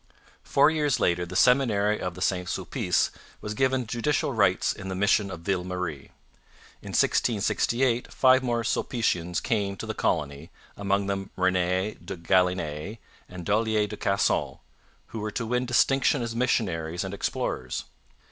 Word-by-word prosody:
Four 145 Hz, +3 st, +4 dB
years 150 Hz, -4 st, +1 dB
later 90 Hz, -3 st, +1 dB
the 95 Hz, -, -8 dB
Seminary 105 Hz, -3 st, +3 dB
of 90 Hz, -1 st, -4 dB
St 90 Hz, -1 st, -1 dB
Sulpice -, -, 0 dB, 0.3 s
was 105 Hz, -, -5 dB
given 130 Hz, +2 st, +1 dB
judicial 125 Hz, +5 st, -1 dB
rights 100 Hz, -5 st, +2 dB
in 95 Hz, -, -9 dB
the 95 Hz, -, -3 dB
mission 100 Hz, +1 st, +2 dB
of 90 Hz, -3 st, -7 dB
Ville 90 Hz, 0 st, -1 dB
Marie. 90 Hz, -6 st, -5 dB, 0.7 s
In -, -, -9 dB
1668 120 Hz, +2 st, +1 dB
five 130 Hz, 0 st, +5 dB
more 120 Hz, -2 st, -1 dB
Sulpicians 90 Hz, -8 st, -1 dB
came 100 Hz, -3 st, -1 dB
to -, -, -6 dB
the -, -, -3 dB
colony, 75 Hz, +1 st, -2 dB, 0.3 s
among 100 Hz, 0 st, 0 dB
them 95 Hz, -1 st, -3 dB
Rene 95 Hz, +2 st, 0 dB
de 95 Hz, -, -6 dB
Galinee 90 Hz, +1 st, 0 dB, 0.3 s
and 90 Hz, -1 st, -8 dB
Dollier 110 Hz, 0 st, +2 dB
de 105 Hz, -, -6 dB
Casson, 100 Hz, -1 st, 0 dB, 0.5 s
who 115 Hz, -, -6 dB
were 105 Hz, 0 st, -3 dB
to 115 Hz, +2 st, -3 dB
win 125 Hz, +2 st, -1 dB
distinction 135 Hz, +2 st, +3 dB
as 115 Hz, -1 st, -4 dB
missionaries 90 Hz, -9 st, 0 dB
and 95 Hz, 0 st, -5 dB
explorers. 65 Hz, -9 st, -3 dB
100 Hz, 145 wpm, -26 LUFS, 90-120 Hz, 0.7 s, five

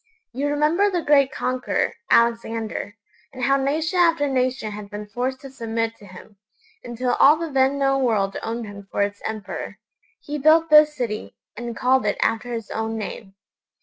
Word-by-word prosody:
You 275 Hz, +4 st, -1 dB
remember 305 Hz, +7 st, +2 dB
the 350 Hz, -4 st, -2 dB
great 280 Hz, -2 st, +4 dB
conqueror, 255 Hz, -1 st, -1 dB, 0.2 s
Alexander, 230 Hz, -3 st, +1 dB, 0.4 s
and 255 Hz, -2 st, -7 dB
how 275 Hz, +2 st, +3 dB
nation 310 Hz, +6 st, 0 dB
after 330 Hz, -4 st, +3 dB
nation 255 Hz, -4 st, -1 dB
had 205 Hz, -1 st, -8 dB
been 210 Hz, 0 st, -7 dB
forced 250 Hz, +5 st, -3 dB
to 275 Hz, -, -10 dB
submit 230 Hz, -2 st, -3 dB
to 205 Hz, -, -15 dB
him, 195 Hz, +2 st, -14 dB, 0.5 s
until 245 Hz, +1 st, -2 dB
all 290 Hz, +3 st, +7 dB
the 325 Hz, -1 st, -5 dB
then 270 Hz, +1 st, +2 dB
known 270 Hz, -1 st, +1 dB
world 205 Hz, -5 st, +1 dB
owned 230 Hz, +1 st, -4 dB
him 200 Hz, -1 st, -10 dB
for 200 Hz, -, 0 dB
its 205 Hz, 0 st, -4 dB
emperor? 215 Hz, -2 st, -6 dB, 0.4 s
He 295 Hz, 0 st, -5 dB
built 315 Hz, +2 st, +4 dB
this 300 Hz, 0 st, +7 dB
city, 230 Hz, -5 st, -4 dB, 0.2 s
and 235 Hz, 0 st, -6 dB
called 255 Hz, -3 st, +2 dB
it 205 Hz, -, 0 dB
after 225 Hz, +2 st, 0 dB
his 225 Hz, -3 st, -5 dB
own 225 Hz, 0 st, -3 dB
name. 200 Hz, -2 st, -7 dB
250 Hz, 175 wpm, -23 LUFS, 220-280 Hz, 0.5 s, all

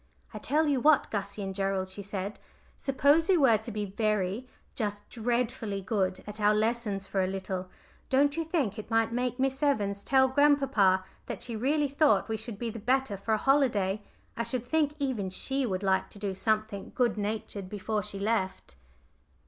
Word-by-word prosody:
"I -, -, -6 dB
tell 310 Hz, +2 st, +1 dB
you 280 Hz, -3 st, +2 dB
what, 300 Hz, 0 st, +4 dB
Gussie 200 Hz, 0 st, -3 dB
and 195 Hz, 0 st, -4 dB
Gerald," 195 Hz, -1 st, -1 dB
she 190 Hz, +2 st, -8 dB
said: 200 Hz, 0 st, -5 dB, 0.4 s
"suppose 285 Hz, +5 st, +3 dB
we 375 Hz, -, +6 dB
were 245 Hz, -8 st, +5 dB
to 220 Hz, -, -6 dB
be 210 Hz, -1 st, -2 dB
very, 210 Hz, +2 st, -1 dB, 0.3 s
just 205 Hz, -2 st, -3 dB
dreadfully 235 Hz, -3 st, -1 dB
good 190 Hz, -2 st, -1 dB
at 210 Hz, +1 st, -7 dB
our 210 Hz, +1 st, +4 dB
lessons 215 Hz, -3 st, 0 dB
for 195 Hz, -1 st, 0 dB
a -, -, 0 dB
little, 190 Hz, -1 st, -4 dB, 0.4 s
don't 285 Hz, +2 st, +3 dB
you 330 Hz, -, -1 dB
think 285 Hz, -, -1 dB
it 215 Hz, -, -8 dB
might 225 Hz, 0 st, +2 dB
make 245 Hz, 0 st, -1 dB
Miss 270 Hz, +1 st, 0 dB
Evans 205 Hz, -9 st, +1 dB
tell 265 Hz, -1 st, +4 dB
grandpapa 265 Hz, -9 st, +3 dB, 0.2 s
that -, -, -5 dB
she 235 Hz, -, -5 dB
really 285 Hz, +6 st, +1 dB
thought 275 Hz, -8 st, +3 dB
we 220 Hz, -, 0 dB
should 220 Hz, -1 st, -6 dB
be 230 Hz, +1 st, -3 dB
the 225 Hz, -, -7 dB
better 255 Hz, 0 st, +1 dB
for 215 Hz, +3 st, 0 dB
a -, -, 0 dB
holiday. 215 Hz, -7 st, +2 dB, 0.3 s
I -, -, -2 dB
should 235 Hz, +1 st, -2 dB
think 300 Hz, +1 st, +1 dB
even 255 Hz, -10 st, -1 dB
she 265 Hz, +7 st, 0 dB
would 190 Hz, -1 st, -2 dB
like 190 Hz, -1 st, +1 dB
to -, -, -13 dB
do 200 Hz, -1 st, -3 dB
something 215 Hz, 0 st, -1 dB
good 245 Hz, -2 st, +2 dB
natured 205 Hz, -2 st, -4 dB
before 210 Hz, +1 st, -2 dB
she 205 Hz, 0 st, -6 dB
left." 200 Hz, -2 st, -1 dB
220 Hz, 190 wpm, -29 LUFS, 200-265 Hz, 0.4 s, we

